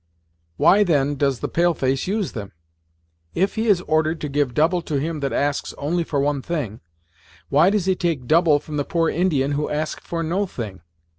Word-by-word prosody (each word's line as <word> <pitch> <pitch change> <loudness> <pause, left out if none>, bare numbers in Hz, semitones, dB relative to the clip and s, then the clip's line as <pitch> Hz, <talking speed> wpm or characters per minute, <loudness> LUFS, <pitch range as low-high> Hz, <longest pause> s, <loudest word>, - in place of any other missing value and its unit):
"Why 210 +2 +5
then 145 -6 +2
does 140 -3 0
the - - -1
pale 175 0 +1
face 135 +2 -1
use 200 -1 -1
them? 100 -3 -7 0.8
If 195 +2 +1
he 225 +1 -1
is 195 -5 +4
ordered 155 0 0
to 150 - -3
give 140 -3 0
double 170 +4 +2
to 155 - -4
him 160 +2 -3
that 140 -1 -2
asks 145 0 -1
only 170 +4 -1
for 145 -3 -2
one 140 0 0
thing, 130 - -4 0.7
why 155 +6 +5
does 205 -3 0
he 190 -1 +2
take 165 -8 -2
double 160 +1 +4
from 150 +1 -6
the 145 - +1
poor 165 +2 0
Indian 150 -6 +1
who 145 +1 -1
ask 155 +1 -3
for 165 -1 -4
no 185 +5 -1
thing. 105 - -7
155 Hz, 200 wpm, -22 LUFS, 140-175 Hz, 0.8 s, Why